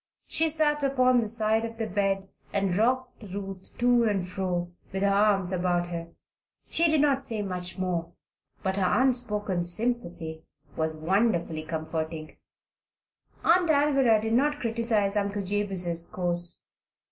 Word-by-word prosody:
She 320 0 +2
sat 295 -1 +2
upon 255 -2 +3
the 225 - -1
side 220 0 +1
of 230 0 -6
the 225 - -2
bed 195 -1 -1 0.2
and 195 -3 0
rocked 250 +5 0
Ruth 195 -2 -8
to 240 -1 +3
and 195 -4 0
fro, 180 -2 -3 0.2
with 190 0 -2
her - - +4
arms 200 -2 +3
about 175 -1 0
her. 170 -1 -5 0.6
She 335 0 +3
did 310 -2 +3
not 280 -2 +2
say 225 -5 +1
much 180 -2 -3
more, 175 -3 -2 0.5
but 190 0 -1
her 190 +3 +2
unspoken 210 -8 0
sympathy 175 -5 0 0.3
was 160 0 -1
wonderfully 170 -2 0
comforting. 160 0 -5 1.1
Aunt 345 0 +4
Alvirah 275 -6 +4
did 225 0 -1
not 290 +4 +2
criticise 225 -3 0
Uncle 200 0 -1
Jabez's 185 -4 0
course. 175 -1 -1
200 Hz, 140 wpm, -27 LUFS, 180-235 Hz, 1.1 s, her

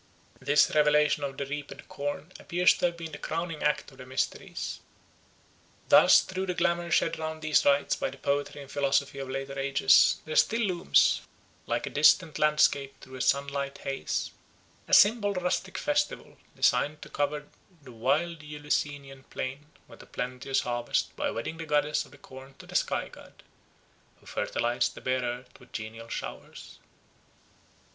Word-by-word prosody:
This 145 +1 +3
revelation 150 0 +3
of 135 -1 -4
the 140 - -3
reaped 145 +1 -7
corn 145 +4 -5
appears 175 +1 +3
to - - +1
have 170 0 -5
been 165 -1 -7
the 145 - -8
crowning 165 -1 -4
act 150 0 0
of 130 - -18
the 130 - -9
mysteries. 130 +1 -3 1.1
Thus - - +8
through 190 +1 -4
the 180 - -2
glamour 170 0 0
shed 165 -1 +1
round 160 0 -5
these 155 -1 +3
rites 140 0 +3
by - - -1
the 135 - -11
poetry 140 +1 -2
and 135 - -14
philosophy 140 0 0
of 135 -1 -5
later 135 +1 -4
ages 135 0 +4
there 155 - -5
still 230 +2 +3
looms, 180 -4 +3 0.5
like - - -1
a - - -6
distant 155 +2 +4
landscape 145 -2 +2
through 130 - -14
a - - -5
sunlit 140 0 0
haze, 135 0 -3 0.6
a - - -6
simple 205 -1 +5
rustic 180 +1 -2
festival 295 0 -1 0.2
designed 150 +1 +1
to - - -11
cover 150 +1 -2 0.4
the 130 - -12
wide 150 +8 0
Eleusinian 145 -2 -3
plain 135 +3 -6 0.2
with - - -14
a - - -15
plenteous 130 +2 -2
harvest 120 -1 -2
by - - -1
wedding 140 +8 -4
the 165 -1 -7
goddess 150 0 +1
of - - -19
the 145 - -15
corn 135 0 -13
to - - -13
the - - -12
sky - - 0
god, - - -16 0.8
who - - -24
fertilised 120 +1 -1
the - - -10
bare 130 0 0
earth 125 +1 -6
with 125 - -18
genial 115 +1 -7
showers. - - -8
145 Hz, 165 wpm, -28 LUFS, 135-160 Hz, 1.1 s, Thus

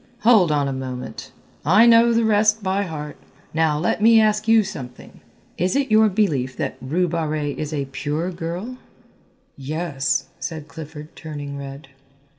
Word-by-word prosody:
"Hold 215 -7 +5
on 145 -2 +1
a 135 - -2
moment, 130 -1 -6 0.3
I 190 +10 +6
know 235 0 +6
the 230 0 +2
rest 215 0 +3
by 190 +1 0
heart. 150 -3 -7 0.4
Now 160 -2 +2
let 165 +6 -1
me 225 +1 +6
ask 215 0 +2
you 225 -1 +5
something. 130 -11 -9 0.4
Is 180 +3 +1
it 275 -4 0
your 215 0 +5
belief 155 - 0
that - - -3
Rue 170 +8 0
Barrée 155 -3 -2
is 155 0 -4
a 145 -3 -2
pure 150 +6 -3
girl?" 175 +9 -5 0.8
"Yes," 145 0 -2
said 160 -3 -6
Clifford, 155 -1 -10
turning 145 -3 -7
red. 140 0 -8
160 Hz, 155 wpm, -22 LUFS, 145-210 Hz, 0.8 s, I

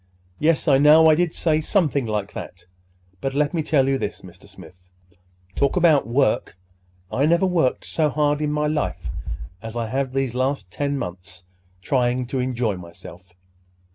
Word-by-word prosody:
Yes, 160 +2 +1
I 135 -2 +5
know 155 +3 +7
I - - +5
did 170 +1 +1
say 155 -2 0
something 150 - +1
like 105 -2 -3
that. 90 0 -9 0.6
But, 135 0 -3
let 150 +2 +1
me 165 - 0
tell 145 -3 +2
you 135 0 +1
this, 105 - -4
Mr. 90 -1 -15
Smith. 90 0 -16 0.7
Talk 140 - +1
about 165 -7 +4
work!—I 90 -3 -2
never 170 +3 +3
worked 170 -8 0
so 155 -2 0
hard 150 0 0
in 150 -1 0
my 150 0 0
life 150 0 -2 0.5
as 115 +1 -7
I 115 -2 -2
have 130 +1 -1
the 135 0 0
last 130 -6 -2
ten 145 +4 -2
months 90 -4 -8 0.4
trying 125 -1 0
to 130 +2 -3
enjoy 125 -5 -1
myself. 90 +1 -13
135 Hz, 165 wpm, -22 LUFS, 100-150 Hz, 0.7 s, know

